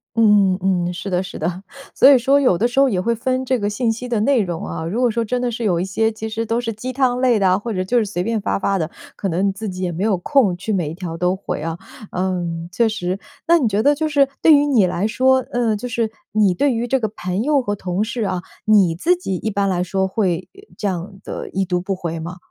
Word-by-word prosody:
嗯 205 -4 +4
嗯 185 -2 +1
嗯， 180 - -3
是 180 +3 -6
的， 180 0 0
是 185 - -8
的。 175 +4 -3 0.3
所 275 - +7
以 265 - +6
说 275 +4 +3
有 255 -10 +3
的 230 - +2
时 245 +2 -1
候 275 - +6
也 190 -7 0
会 235 +4 0
分 255 +3 -1
这 255 0 +1
个 205 -3 -2
信 225 +2 0
息 240 +3 -5
的 235 -3 0
内 260 +4 +3
容 175 -4 -3
啊， 160 - -5
如 205 +9 -2
果 250 - +4
说 230 +1 -1
真 245 +3 -1
的 245 - 0
是 235 +1 -4
有 180 -6 +1
一 180 - -1
些 220 +4 0
其 220 0 -6
实 225 +1 -3
都 230 +2 0
是 230 -1 -3
鸡 250 +5 -6
汤 255 -2 +1
类 250 -4 +3
的 195 - +3
啊， 185 - +3
或 225 +3 -4
者 185 -1 -1
就 240 +7 0
是 230 - +3
随 195 -3 -3
便 225 +1 -1
发 200 - -1
发 195 0 0
的， 160 -3 -2 0.3
可 200 - -3
能 185 +2 0
你 - - +1
自 210 +3 -6
己 185 -1 -5
也 180 - -1
没 170 +3 -3
有 215 -2 +2
空 220 -3 +2
去 200 +5 -4
每 175 -7 0
一 155 - -6
条 170 -2 -6
都 180 +2 +1
回 190 - -5
啊。 165 0 -3 0.3
嗯， 175 -2 -2
确 230 +6 +2
实。 185 -3 -2 0.3
那 340 +1 +6
你 270 -8 +1
觉 210 0 +1
得 290 +4 +4
就 310 +2 -1
是 285 -2 +3
对 320 - +7
于 290 0 +5
你 240 -9 +4
来 180 +3 -1
说， 260 +3 +3
呃， 235 -3 +1
就 230 +4 -5
是 230 -2 -1 0.2
你 210 -3 +3
对 275 +10 +2
于 230 +1 -1
这 265 +2 +1
个 220 - 0
朋 185 -2 -3
友 295 0 +3
和 205 -3 -2
同 185 0 -2
事 230 +2 -4
啊， 185 -2 -2 0.2
你 200 -6 +4
自 340 - +2
己 350 - -4
一 220 - -3
般 200 -1 0
来 180 -2 0
说 190 +1 0
会， 185 -3 -1
呃， 390 - -15 0.2
这 205 - -2
样 185 +2 -4
地 - - -6
已 195 +1 0
读 180 -1 -1
不 195 +1 -2
回 170 -2 -4
吗？ 175 +3 -6
205 Hz, 300 characters per minute, -20 LUFS, 185-240 Hz, 0.3 s, 所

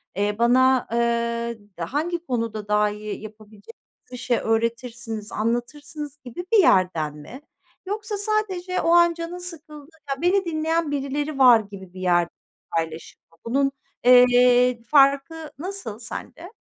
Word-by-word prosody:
Eee, 205 +2 0
bana, 255 +2 +4
eee, 235 0 -1 0.2
hangi 320 - -3
konuda 230 -5 -3
daha 210 0 +2
iyi 210 0 -6
yapabilecek 215 0 -13 0.4
bir 250 - -7
şey 245 -1 0
öğretirsiniz, 225 -1 -2
anlatırsınız?" 285 +6 -4
gibi 250 +9 -7
bir - - +7
yerden 180 - +3
mi? 235 - -11 0.4
Yoksa 420 +2 -4
sadece 395 -3 -1
o - - 0
an 345 0 +5
canın 335 +1 -6
sıkıldı, 315 -4 -10 0.2
"Ya, 275 0 -3
beni 375 +2 +2
dinleyen 320 -1 -1
birileri 285 +1 -3
var." 250 -3 +8
gibi 200 -3 -11
bir 185 - -9
yerden 175 -2 +2 0.5
paylaşım 165 0 -5
mı? 165 - -25
Bunun, 275 +4 +1 0.3
eee, 245 -1 +5
farkı 285 +4 +2
nasıl 355 - -6
sende? 330 - -9
250 Hz, 135 wpm, -23 LUFS, 220-315 Hz, 0.5 s, var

